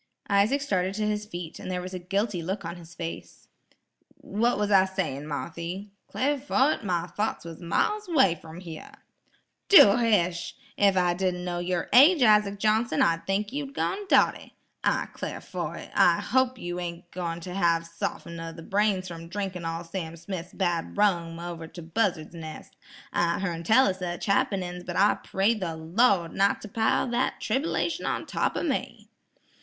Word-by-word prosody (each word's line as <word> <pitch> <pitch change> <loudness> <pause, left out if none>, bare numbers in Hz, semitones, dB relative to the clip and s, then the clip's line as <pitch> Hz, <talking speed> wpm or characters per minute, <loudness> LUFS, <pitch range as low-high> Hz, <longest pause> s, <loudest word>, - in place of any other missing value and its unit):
Isaac 210 +8 +3
started 190 -6 0
to 215 0 -1
his 210 0 -2
feet, 175 -4 -7
and - - -7
there 180 -1 -2
was 185 +1 -7
a 185 - -4
guilty 195 +1 -1
look 190 +3 -4
on 170 +1 -5
his 175 -1 -13
face. 165 -1 -7 0.7
"What 235 +4 0
was 210 0 0
I 190 -1 +6
sayin', 180 -7 -3
Marthy? 170 +6 -5 0.2
'Clar 285 +2 0
fo' 275 0 +2
it, 310 - -1
my 175 -4 0
thoughts 205 0 -3
was 165 0 -9
miles 420 - 0
'way 265 - +4
from 165 +1 -11
hyar." 165 -3 -9 0.7
"Do 225 - +9
hish! 180 -7 +1 0.2
Ef 200 -2 +3
I 180 -1 +3
didn't 180 0 -1
kno' 175 -1 -2
yer 175 0 -1
age, 290 +3 +7
Isaac 210 -2 +4
Johnson, 215 -3 +2
I'd 165 0 +1
think 205 +3 -1
you 280 -1 -4
gone 390 +8 -2
dotty. - - +2 0.3
I - - +1
'clar - - -5
fo' - - -5
it, - - -9
I - - +5
hope 260 -1 +1
you 175 0 -4
ain't 175 0 -6
goin' 170 -2 -4
ter 180 +1 -7
have 170 -3 +2
sof'n 170 0 -5
o' 165 0 -5
the 165 0 -11
brain 200 0 +1
from 165 -2 -8
drinkin' 185 -1 -4
all 165 +1 -3
Sam 165 -1 -6
Smith's 175 +1 -6
bad 175 -3 -1
rum 170 -5 +1
over 170 -1 -6
to 170 - -10
Buzzard's 170 -2 -1
Nes'. 160 -2 -9 0.4
I 170 -1 +1
hern 175 -4 -3
tell 225 +10 +5
o' - - +3
sech 180 -2 -5
happenin's, 185 -3 0
but 175 -1 -6
I 200 +2 +5
pray 195 +4 0
the 185 -7 -4
Lawd 170 +2 +2
not 200 +1 +2
to - - -7
pile 220 +4 +1
that 240 +2 0
trib'lation 320 +4 -1
on - - -2
top - - -1
o' - - -1
me." - - -3
185 Hz, 180 wpm, -27 LUFS, 170-210 Hz, 0.7 s, Do